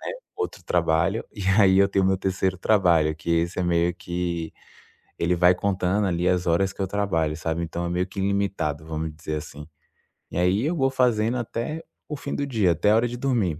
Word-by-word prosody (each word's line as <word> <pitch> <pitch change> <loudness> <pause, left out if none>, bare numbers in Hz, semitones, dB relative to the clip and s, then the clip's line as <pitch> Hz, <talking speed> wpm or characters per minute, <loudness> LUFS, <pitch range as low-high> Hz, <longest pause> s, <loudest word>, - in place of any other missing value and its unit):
né. - - -13 0.2
Outro 435 -1 -4
trabalho. 85 +5 +1
E 105 -4 -6 0.2
aí 95 -2 +5
eu 100 0 +5
tenho 95 -1 +1
meu 95 0 +2
terceiro 95 -1 -1
trabalho, 85 -7 +3
que 80 +2 -8
esse 85 +2 +1
é - - +1
meio 85 0 +1
que, 85 -2 -4 0.7
ele 85 +1 +1
vai 90 +1 +5
contando 95 +1 0
ali 90 -1 0
as 90 -1 +1
horas 95 +3 +2
que - - -22
eu 95 - 0
trabalho, 85 -6 0
sabe. 85 +1 -2
Então 85 +1 -4
é - - -2
meio 90 +1 0
que 95 +1 -8
ilimitado, 95 -7 -1
vamo 80 0 -3
dizer 75 0 -5
assim. 75 0 -9 0.6
E - - -6
aí 90 +6 +2
eu 160 +4 0
vou 135 -4 +1
fazendo 120 -3 +2
até 120 +7 -4 0.2
o 150 - -4
fim 140 0 -5
do 140 - -1
dia, 110 -10 +2
até 105 +6 +2
a 110 - +5
hora 120 +2 +3
de 120 +1 -6
dormir. 115 - 0
90 Hz, 210 wpm, -24 LUFS, 85-105 Hz, 0.7 s, aí